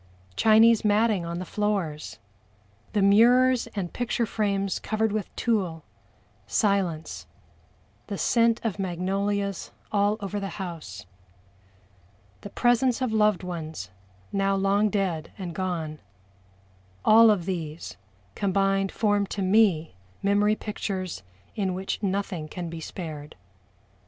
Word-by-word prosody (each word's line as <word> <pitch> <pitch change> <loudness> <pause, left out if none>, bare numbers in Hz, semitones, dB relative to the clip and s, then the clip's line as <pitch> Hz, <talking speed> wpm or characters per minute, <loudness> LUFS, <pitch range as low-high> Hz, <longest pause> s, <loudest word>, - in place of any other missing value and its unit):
Chinese 225 - +5
matting 210 -2 +2
on 170 0 -4
the 185 - -4
floors 190 -7 -2 0.8
the 205 -2 +2
mirrors 240 +5 +5
and 185 -4 -3
picture 240 -1 -1
frames 200 -3 -1
covered 220 0 -1
with 215 -1 -2
tulle 185 -9 -1 0.6
silence 175 - 0 0.8
the 200 - -4
scent 230 +1 +3
of 215 -3 -2
magnolias 195 +2 -2 0.2
all 205 +1 +2
over 205 0 -4
the 195 -1 -5
house 155 - -7 1.4
the 205 - -8
presence 245 +2 +2
of 255 -4 -1
loved 210 -4 +3
ones 160 - -6 0.4
now 195 0 +1
long 200 +2 +2
dead 185 -6 -2
and 180 -3 -5
gone 165 -5 -3 1.1
all 225 +1 +8
of 195 -6 +2
these 165 - -5 0.4
combined 195 - +1
form 205 -2 +1
to 195 - -3
me 185 -5 +3 0.3
memory 205 +1 +3
pictures 190 - -4 0.3
in 190 -3 -1
which 190 +3 -4
nothing 195 -5 -2
can 175 +1 -6
be 165 - -6
spared. 155 -4 -7
195 Hz, 115 wpm, -26 LUFS, 175-210 Hz, 1.4 s, all